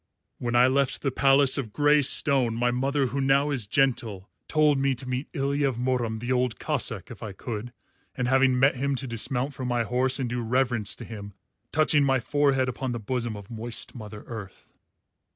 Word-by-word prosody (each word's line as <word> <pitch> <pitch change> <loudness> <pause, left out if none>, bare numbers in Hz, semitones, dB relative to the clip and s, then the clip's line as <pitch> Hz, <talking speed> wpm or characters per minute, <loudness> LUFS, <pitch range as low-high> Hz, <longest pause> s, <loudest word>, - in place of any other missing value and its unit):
When 120 0 -2
I 120 +1 +6
left 135 +1 +1
the 135 - 0
palace 135 +1 +4
of 115 -6 -5
grey 145 +4 +3
stone 135 -4 +4
my 120 +1 +1
mother, 135 +3 0
who 135 +3 -2
now 140 +2 +2
is 125 -7 -1
gentle, 110 -6 0 0.2
told 150 -2 +3
me 135 -1 +1
to 130 +1 -10
meet 125 +2 -3
Ilya 140 -1 0
of 125 - -5
Murom 120 -3 -1
the 120 +3 -4
Old 125 -3 0
Cossáck - - -2
if - - -11
I 105 -3 -6
could, 115 +3 -6 0.4
and 125 -1 -1
having 130 0 +3
met 135 +2 +4
him 140 +2 -1
to 135 - -5
dismount 125 +3 -2
from 130 -2 -5
my 120 -1 0
horse 125 +3 +1
and 130 -3 -2
do 120 +1 -3
reverence 120 -2 0
to - - -9
him, 100 -2 -9 0.4
touching 155 -1 +3
my 135 -1 +2
forehead 135 0 +1
upon 125 0 -3
the 120 - -4
bosom 115 0 -3
of 100 +2 -12
moist 115 +1 -5
Mother 105 -3 -9
Earth." 105 -5 -10
125 Hz, 200 wpm, -26 LUFS, 120-135 Hz, 0.4 s, I